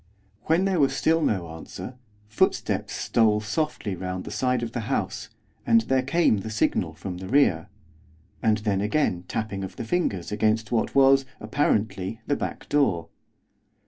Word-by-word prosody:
When 165 +4 +3
there 190 -3 +1
was 140 -2 +3
still 165 +1 +2
no 95 - 0
answer, 80 +9 -8 0.3
footsteps 105 - 0
stole 110 -2 +2
softly 110 -2 -2
round 90 0 -4
the - - -8
side 125 -2 0
of 115 - -4
the 120 - -3
house, - - -2 0.3
and 115 0 +4
there 130 +3 +1
came 140 -3 +2
the 100 +3 -5
signal 90 -6 0
from 90 +2 -6
the 95 - -7
rear, 100 - +2 0.7
and 110 -1 +3
then, 105 -3 -1
again, 105 - 0
tapping 105 -3 -3
of 95 -1 -7
fingers 110 - -2
against 110 +1 +1
what 115 -2 0
was, 135 0 +5
apparently, 105 -4 -1
the 145 - +1
back - - -5
door. 135 - +1
110 Hz, 155 wpm, -25 LUFS, 95-135 Hz, 0.7 s, was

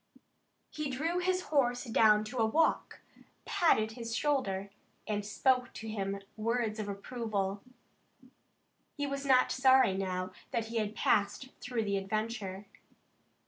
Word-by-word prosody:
He 305 -2 -3
drew 320 +7 -1
his 365 +1 +1
horse 245 -4 +2
down 220 -3 +4
to 240 +4 -5
a 225 - +4
walk, 315 +8 +1 0.4
patted 315 - +2
his 230 0 -5
shoulder, 200 -10 0 0.4
and 210 -1 -1
spoke 250 +5 +1
to 220 - -7
him 200 -2 -3 0.2
words 225 0 -1
of 205 -1 -3
approval. 200 -2 -3 1.4
He 290 - -1
was 275 0 -4
not 255 -1 +5
sorry 260 -6 +5
now 185 -1 -2 0.2
that 225 -1 -2
he 230 - -3
had 215 -1 -1
passed 205 +7 +1
through 245 -2 -2
the 200 -1 0
adventure. 205 -1 -3
225 Hz, 135 wpm, -32 LUFS, 205-260 Hz, 1.4 s, not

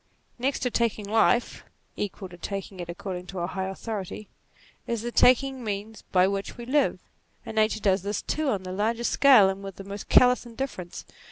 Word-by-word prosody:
Next 265 +3 0
to 250 - 0
taking 220 -3 0
life 225 +3 +2 0.3
(equal 200 -1 -4
to 175 - -11
it 195 -3 -5
according 180 +1 -6
to 190 - -8
a - - 0
high 190 +1 -3
authority) 205 +1 -6 0.6
is 235 -1 -2
taking 265 +2 +4
the 250 - -9
means 210 +1 -5
by 185 0 +5
which 195 +3 -3
we 240 - -7
live; 285 +4 +2 0.5
and - - -6
Nature 215 0 +2
does 195 -1 +2
this 200 +2 -3
too 310 -2 -1
on 200 -6 -1
the 185 - -6
largest 225 +5 0
scale 260 -8 +7
and 195 +1 -3
with 195 -2 -7
the 195 - -9
most 200 +1 -8
callous 250 0 +6
indifference. 230 -7 -6
210 Hz, 185 wpm, -26 LUFS, 190-235 Hz, 0.6 s, scale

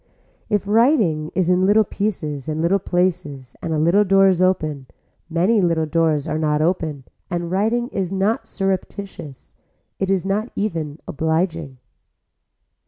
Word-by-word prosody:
If 205 -1 0
writing 210 - +3
is 180 -1 +2
in 180 +1 +3
little 215 +2 +5
pieces 160 -10 -3
and 155 0 -2
little 175 +5 +2
places 175 -8 -2
and 165 - -4
a 160 - 0
little 170 +7 +4
door 195 0 +4
is 185 -1 +1
open, 155 -7 0 0.4
many 185 +7 +2
little 165 -3 +1
doors 155 -2 +1
are 155 - -2
not 150 -1 +1
open 155 -4 -1 0.3
and 175 -2 -3
writing 225 +5 +1
is 190 -6 -3
not 205 +4 0
surreptitious, 195 -7 -5 0.5
it 195 - -1
is 195 -2 +1
not 210 +4 -1
even 165 -8 -3
obliging. 160 -2 -1
175 Hz, 145 wpm, -21 LUFS, 155-195 Hz, 0.5 s, little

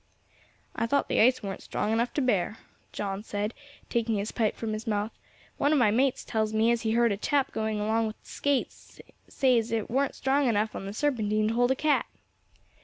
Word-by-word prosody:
"I 230 - 0
thought 280 +3 +1
the - - +1
ice 250 +1 +4
weren't 195 -2 -5
strong 210 +1 -2
enough 235 +2 +1
to 290 - +1
bear," 215 -4 +1 0.3
John 195 -1 -3
said, 210 +1 -3 0.3
taking 230 -2 0
his 205 +1 -2
pipe 220 -3 0
from 220 -1 -3
his 215 +1 -5
mouth; 210 0 -1 0.5
"one 285 - +3
of 305 - +4
my 230 -6 +4
mates 255 +4 +1
tells 220 -1 -1
me 225 +2 +4
as 235 -1 +1
he 220 -1 0
heard 235 -1 +3
a 200 - -1
chap 280 +5 0
going 220 -1 -2
along 220 +2 +1
with 215 - -6
skates 285 -2 -3 0.3
say 255 -3 +3
as 225 0 -4
it 225 -2 -2
weren't 270 +2 +1
strong 270 +1 +1
enough 215 -1 +1
on 195 - -5
the 200 - -5
Serpentine 215 -5 +1
to - - -1
hold 245 +1 +3
a 265 - +3
cat." 300 +2 +1
225 Hz, 210 wpm, -28 LUFS, 215-255 Hz, 0.5 s, ice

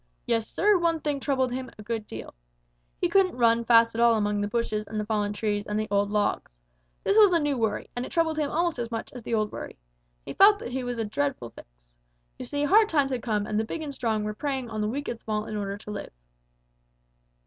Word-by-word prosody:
Yes, 225 -2 0
Sir, 410 -2 +3
one 335 -1 +1
thing 295 -2 -2
troubled 260 -2 0
him 255 0 -4
a 210 - -10
great 220 -1 -4
deal. 110 - -8 0.7
He 355 - +2
couldn't 370 -3 +2
run 235 -1 +3
fast 230 0 +5
at 230 - -1
all 235 -1 +6
among 205 -1 0
the 205 - 0
bushes 215 -1 -1
and 215 - -4
the 210 - -2
fallen 210 -1 0
trees 205 0 -2
and 210 +1 -1
the 215 - -2
old 200 0 +2
logs. 210 - 0 0.5
This 405 +2 +4
was 415 -3 +7
a - - +5
new 295 -2 0
worry, 225 -4 -1
and 245 - -2
it - - -7
troubled 320 -2 +1
him 295 -2 0
almost 335 -3 0
as 235 -1 -3
much 230 -1 -5
as 250 - -8
the 230 - -2
old 215 -1 0
worry. - - -8 0.5
He - - -6
felt 410 +1 +7
that 240 - -7
he 260 0 -2
was 245 -1 -3
in 225 - -1
a - - -7
dreadful 275 - -2
fix. - - -13 0.7
You - - -5
see, 290 0 -2
hard 425 +8 +5
times 285 -4 +2
had 250 -2 -2
come, 215 -3 -1
and 210 0 -1
the - - +1
big 315 +8 -5
and 290 -2 -5
strong 225 -5 -1
were 210 0 -3
preying 265 -1 -3
on 215 -1 -3
the 210 - 0
weak 285 +5 -4
and 235 - -4
small 215 -1 -3
in 215 - -5
order 200 -1 -3
to 210 0 -9
live. 205 - -6
235 Hz, 250 wpm, -26 LUFS, 215-285 Hz, 0.7 s, was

